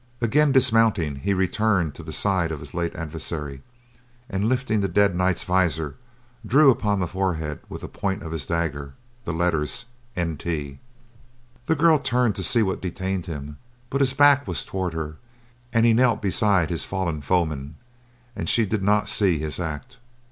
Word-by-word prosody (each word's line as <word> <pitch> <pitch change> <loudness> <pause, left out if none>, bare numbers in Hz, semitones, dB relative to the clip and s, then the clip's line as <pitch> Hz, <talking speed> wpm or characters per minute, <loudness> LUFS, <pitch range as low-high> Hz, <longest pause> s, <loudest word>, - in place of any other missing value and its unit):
Again 140 +6 +3
dismounting, 115 - +3
he 100 +8 -2
returned 95 -3 +1
to - - -10
the 80 -1 -8
side 95 -2 0
of 80 - -4
his - - -9
late 85 -1 -2
adversary, 75 -3 -5 0.7
and 100 +3 0
lifting 125 -4 0
the 100 - +1
dead 100 0 +2
knight's 90 0 +1
visor, 80 -5 0 0.5
drew 135 +6 +6
upon 105 -5 0
the 90 - 0
forehead 80 -6 -2
with - - -7
the - - -6
point 95 -3 -3
of 80 - -6
his 80 -3 -4
dagger 75 -5 -2 0.3
the - - -2
letters 85 +4 0 0.3
NT. 80 -4 -2
The 120 - -6
girl 160 0 +5
turned 125 -5 +1
to 95 - -3
see 115 +4 +2
what 95 -2 -2
detained 95 0 -3
him, 75 -2 -6 0.3
but 140 - 0
his 130 -1 +2
back 145 0 +5
was - - -3
toward 95 -3 -3
her 75 -1 -4 0.5
and 115 -1 +3
he 115 - +5
knelt 120 -2 +3
beside 100 -4 +2
his 85 - -1
fallen 85 -5 -2
foeman, 75 -3 -1 0.6
and - - -3
she 115 - +3
did 105 +1 -2
not 105 +2 +2
see 95 -6 +2
his 75 +2 -4
act. 75 -4 -5
95 Hz, 170 wpm, -24 LUFS, 80-115 Hz, 0.7 s, drew